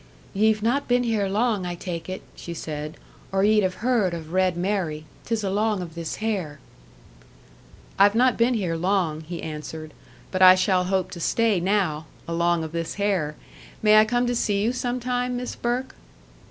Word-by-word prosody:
"Ye've 215 +1 +2
not 260 +5 +1
been 245 0 +3
here 220 -4 0
long, 210 0 +1
I 175 -1 -3
take 170 -1 -6
it," 185 - -5
she 170 - -7
said, 155 0 -6 0.3
"or 195 0 +1
ye'd 210 +1 +4
have 185 +3 -2
heard 210 -9 +2
of 160 0 -8
'Red 185 -2 +2
Mary.' 175 -5 -2 0.2
'Tis 225 -2 -1
along 205 0 0
of 165 -2 -9
this 170 -1 -5
hair." 195 -10 -3 1.4
"I've 200 +2 +6
not 250 +1 +4
been 240 +2 +2
here 180 -6 -1
long," 175 -3 0
he 170 +2 -7
answered, 155 0 -7 0.4
"but 185 - -2
I 185 0 +10
shall 185 -1 +2
hope 190 -1 0
to 175 - -7
stay 220 +2 +2
now 175 -5 0 0.2
along 170 0 +1
of 160 - -6
this 165 0 -3
hair! 190 -7 0 0.5
May 215 0 +7
I 215 - +6
come 245 +2 +1
to 245 0 0
see 205 -3 +1
you 235 +3 +1
some 250 0 -2
time, 250 0 -1
Miss 250 0 -4
Burke?" 245 +2 -2
195 Hz, 180 wpm, -24 LUFS, 170-220 Hz, 1.4 s, I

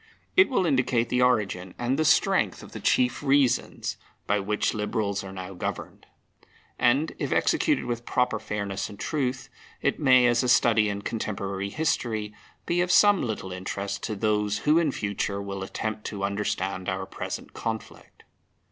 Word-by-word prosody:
It 390 -4 +6
will 195 -9 +1
indicate 130 -5 +1
the 125 - +1
origin 105 -7 +1
and 120 +2 0
the - - +3
strength 155 - +2
of - - -12
the - - -7
chief 125 -1 +2
reasons 135 -3 +1 0.3
by 105 +1 +1
which 105 +2 0
Liberals 105 -2 -2
are 95 - -8
now 95 0 -7
governed. 90 - -6 0.7
And, 135 +6 +3
if - - -2
executed 300 -3 +2
with 120 -1 -3
proper 125 -2 0
fairness 100 -2 -3
and 100 - -11
truth, 130 -3 -2 0.3
it - - 0
may, 130 -4 +6
as 120 -1 +3
a 125 - 0
study 110 -3 +4
in 100 0 -4
contemporary 100 -3 -3
history, 110 -6 -1 0.3
be 175 +1 +1
of 180 0 +1
some 205 -1 +6
little 105 -5 -4
interest 100 +2 -4
to 110 - -3
those 105 0 0
who 155 +3 +5
in 160 -4 +1
future 100 -3 -2
will 100 -1 -5
attempt 110 +3 -4
to 100 -2 -4
understand 100 -2 -2
our 95 0 -2
present - - -6
conflict. 110 -1 -6
110 Hz, 165 wpm, -26 LUFS, 100-125 Hz, 0.7 s, It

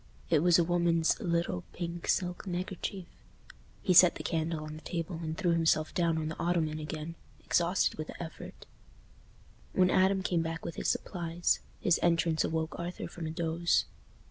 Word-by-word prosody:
It - - +5
was 175 +2 +5
a 175 - +4
woman's 170 -1 +2
little, 170 - -1
pink, 170 -1 -5
silk 180 +2 0
neckerchief. 185 +1 -4 0.8
He 185 - +3
set 180 0 +8
the - - -6
candle 160 -1 -1
on 155 0 -7
the 155 - -9
table, 165 0 -4
and 160 -1 -4
threw 175 - +1
himself 160 -2 +2
down 170 -2 +1
on 155 -1 -2
the 160 - -6
ottoman 165 -3 0
again, 155 +2 -5 0.3
exhausted 175 -1 +1
with 155 - -3
the - - -7
effort. 160 - -10 1.1
When 185 -1 +4
Adam 190 0 +3
came 175 -3 +1
back 165 0 -4
with 170 - -4
his - - -2
supplies, 175 -2 0 0.2
his 175 - +2
entrance 165 -1 +2
awoke 160 0 -2
Arthur 175 +1 -4
from 165 -2 -6
a - - -3
doze. 165 +1 +1
170 Hz, 170 wpm, -31 LUFS, 160-175 Hz, 1.1 s, set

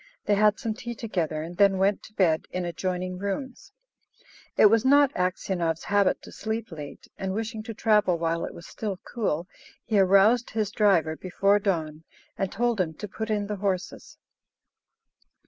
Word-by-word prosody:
They - - +2
had 210 0 +4
some 225 - -3
tea 235 +1 -7
together, 170 -9 -2
and 170 +2 -8
then 195 -1 +5
went 195 +1 +2
to 215 - -15
bed 170 -6 +2
in 180 -1 -3
adjoining 180 +1 -3
rooms. 260 - -5 0.9
It - - +7
was 220 +1 +5
not 285 +1 +5
Aksionov's 180 -2 -1
habit 200 -1 +2
to - - -11
sleep 220 -1 -4
late, 150 -3 -9
and, 190 0 -2
wishing 225 0 -3
to 225 +1 -7
travel 210 -5 +3
while 165 0 -1
it - - -5
was 170 - -11
still 205 -4 -5
cool, 180 -8 -2 0.4
he 215 -3 +2
aroused 200 +5 +4
his 215 -2 -2
driver 190 -7 +3
before 195 +4 +1
dawn, 160 -6 -2 0.3
and 195 - -2
told 235 -2 +1
him 160 -3 -3
to 210 - -6
put 220 +2 -5
in 210 -1 0
the 210 0 -4
horses. 190 -2 -3
200 Hz, 170 wpm, -26 LUFS, 180-215 Hz, 0.9 s, It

